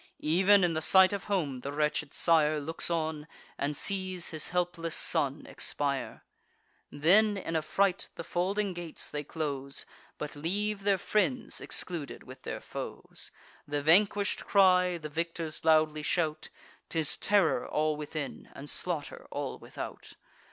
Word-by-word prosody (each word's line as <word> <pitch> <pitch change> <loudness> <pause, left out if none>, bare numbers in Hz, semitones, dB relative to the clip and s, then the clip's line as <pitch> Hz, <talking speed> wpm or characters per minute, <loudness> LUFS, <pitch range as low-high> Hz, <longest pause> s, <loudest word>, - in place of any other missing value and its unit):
Ev'n 190 +5 +5
in 175 -2 +2
the 160 - -1
sight 190 +4 +6
of 200 - -4
home, 160 -11 -1
the 140 +3 -5
wretched 150 0 0
sire 155 -2 +3
Looks 160 +4 0
on, 160 -2 -2 0.3
and 145 +1 -2
sees 185 -3 0
his 155 -2 -1
helpless 175 -2 -1
son - - +2
expire. 140 -2 -3 0.7
Then, 200 +8 +4
in 165 -3 -4
a 160 - +2
fright, 195 +4 +1
the - - -6
folding 195 +2 -1
gates 175 -2 -4
they 150 0 -4
close, 140 -3 -4 0.3
But 150 -1 -5
leave 200 +6 -2
their 200 -1 +4
friends 225 +6 0
excluded 170 -6 -2
with 130 +1 -12
their - - -5
foes. - - -7 0.4
The 145 0 -2
vanquish'd 200 +5 +3
cry; 180 -3 +5
the 155 -2 -6
victors 165 0 -3
loudly 155 -1 +3
shout; 155 0 -1 0.4
'Tis 160 -3 +1
terror 200 -5 +2
all 155 0 +1
within, 150 -1 -6
and 145 +1 -5
slaughter 165 -5 -3
all 145 -1 -4
without. - - -8
165 Hz, 145 wpm, -30 LUFS, 150-185 Hz, 0.7 s, sight